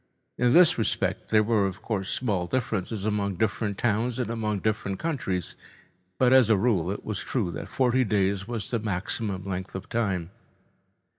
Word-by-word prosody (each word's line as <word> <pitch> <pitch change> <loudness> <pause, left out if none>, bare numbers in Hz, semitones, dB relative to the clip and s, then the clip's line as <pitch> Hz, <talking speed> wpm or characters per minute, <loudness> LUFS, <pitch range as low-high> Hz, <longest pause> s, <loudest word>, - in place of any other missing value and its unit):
In 125 0 +2
this 175 -6 +6
respect, 110 - -1
there 110 -1 +4
were, 105 -2 +2
of 95 +3 -7
course, 100 -4 -2
small 100 -8 -1
differences 105 -2 -2
among 100 -2 0
different 105 0 -1
towns 115 +2 0
and 120 -3 -2
among 110 -2 -1
different 100 -2 -1
countries, 100 - -2 0.6
but 125 +3 +4
as 130 -4 +6
a 110 - +5
rule 95 -5 +1
it 100 - -4
was 110 -3 -3
true 105 -9 -2
that - - -6
forty 130 0 +2
days 100 -2 0
was 115 -4 -4
the 115 - +1
maximum 100 -1 -3
length 95 0 -4
of 95 0 -6
time. 95 -7 -1
105 Hz, 170 wpm, -26 LUFS, 95-115 Hz, 0.6 s, this